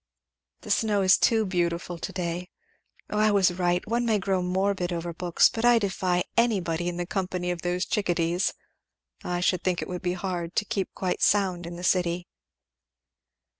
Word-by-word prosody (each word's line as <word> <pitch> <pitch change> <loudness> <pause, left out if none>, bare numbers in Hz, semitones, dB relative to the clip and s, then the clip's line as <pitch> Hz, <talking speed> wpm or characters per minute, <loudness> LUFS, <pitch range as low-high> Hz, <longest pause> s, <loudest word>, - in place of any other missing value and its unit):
"The - - -6
snow 210 -3 +2
is 185 0 +6
too 225 -2 +3
beautiful 175 -2 -2
to 190 - -5
day. 180 -1 -4 0.6
O 210 - 0
I 215 0 +4
was 195 -3 +3
right! 175 0 0
one 235 +2 0
may 225 -3 +2
grow 190 -1 0
morbid 185 0 0
over 170 0 -3
books 175 0 +3
but 225 - -4
I 240 0 +6
defy 185 -4 0
anybody 180 -8 +1
in 175 - -5
the 175 - -2
company 180 -1 -2
of 175 -1 -4
those 180 +1 -1
chick 205 -3 -1
a 175 - +3
dees. 170 +2 +1 0.7
I 175 0 -2
should 180 0 +1
think 180 -2 0
it - - -4
would 180 -1 -5
be 180 -1 -1
hard 175 -2 -4
to 210 - +1
keep 200 -3 -2
quite 185 -2 -2
sound 185 -4 +2
in 170 - -7
the 175 - -8
city." 180 -1 +1
180 Hz, 190 wpm, -26 LUFS, 175-195 Hz, 0.7 s, is